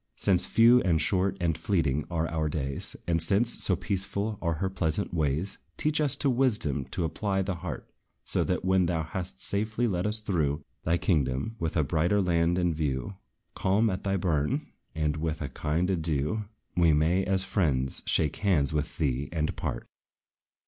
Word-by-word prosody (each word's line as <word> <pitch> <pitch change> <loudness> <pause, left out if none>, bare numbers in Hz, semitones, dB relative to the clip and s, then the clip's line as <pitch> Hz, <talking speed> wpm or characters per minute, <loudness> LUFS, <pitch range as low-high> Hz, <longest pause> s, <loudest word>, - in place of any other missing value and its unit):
Since 95 -3 +3
few, 120 +2 +6
and 85 -4 +2
short, 90 +5 +1
and 85 -3 0
fleeting 75 -8 0
are 85 -2 -1
our 80 -2 -1
days; 70 -3 -3
And 85 -1 +1
since, 105 +8 +3
so 95 - +3
peaceful 100 +2 -2
are 85 -2 0
her 90 +5 -2
pleasant 95 0 -2
ways, 80 +3 -1 0.2
Teach 155 0 +1
us 145 -4 +3
to 145 - 0
wisdom 105 - +1
to 90 - -3
apply 95 +4 -1
the 95 0 -2
heart: 90 +1 -6 0.4
So - - 0
that, - - -1
when 95 -1 +3
thou 80 -2 0
hast 80 -4 -5
safely 110 +4 0
led 90 -1 -1
us 105 +1 +2
through 80 -8 -1 0.2
Thy 85 +2 +2
kingdom, 75 - 0
with 80 0 -2
a 80 - +3
brighter 85 +7 +1
land 85 -2 +2
in 90 -2 +1
view, 75 +2 -3 0.4
Calm 105 +4 +2
at 95 +1 -4
thy 100 -1 0
bourn, 90 - 0 0.3
and 75 -1 0
with 80 0 -2
a 70 - -4
kind 75 +7 -1
adieu, 80 +4 -1 0.3
We 85 -3 +4
may, 80 +6 +2
as 95 0 +4
friends, 75 -9 0
shake 75 -2 +1
hands 85 -9 +1
with 75 0 -2
thee 70 -3 -1
and 80 -2 -1
part. - - -4
85 Hz, 175 wpm, -28 LUFS, 75-95 Hz, 0.4 s, few